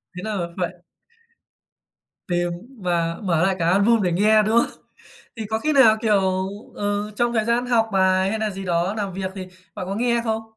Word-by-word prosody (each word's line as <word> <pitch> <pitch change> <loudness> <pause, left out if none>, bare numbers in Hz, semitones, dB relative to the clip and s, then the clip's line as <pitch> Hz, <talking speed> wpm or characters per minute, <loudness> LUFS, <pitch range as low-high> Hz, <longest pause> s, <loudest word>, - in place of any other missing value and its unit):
Thế 180 - -6
là 200 -5 -2
phải 180 -2 -2 1.5
tìm 175 -1 0 0.3
và 170 -2 -1
mở 170 -4 +1
lại 190 0 +1
cả 165 0 +2
album 205 +5 +3
để 180 -3 +1
nghe, 215 +4 +4
đúng 220 +2 +2
không? - - -3 0.6
Thì 225 - -5
có 220 +1 -1
khi 305 +7 0
nào, 235 -6 +6
kiểu, 190 -4 +1 0.3
ừ, 205 -1 -2
trong 240 +1 +1
thời 220 -2 +1
gian 235 +2 0
học 230 -2 +2
bài 190 0 +3
hay 220 - -2
nà 215 -1 -1
gì 195 0 -7
đó 175 +2 0
làm 200 -3 -3
việc 190 0 -4
thì 190 -2 -6 0.3
bạn 185 - -5
có 195 - -3
nghe 235 +2 +1
không? 220 -1 -1
200 Hz, 200 wpm, -22 LUFS, 185-220 Hz, 1.5 s, nào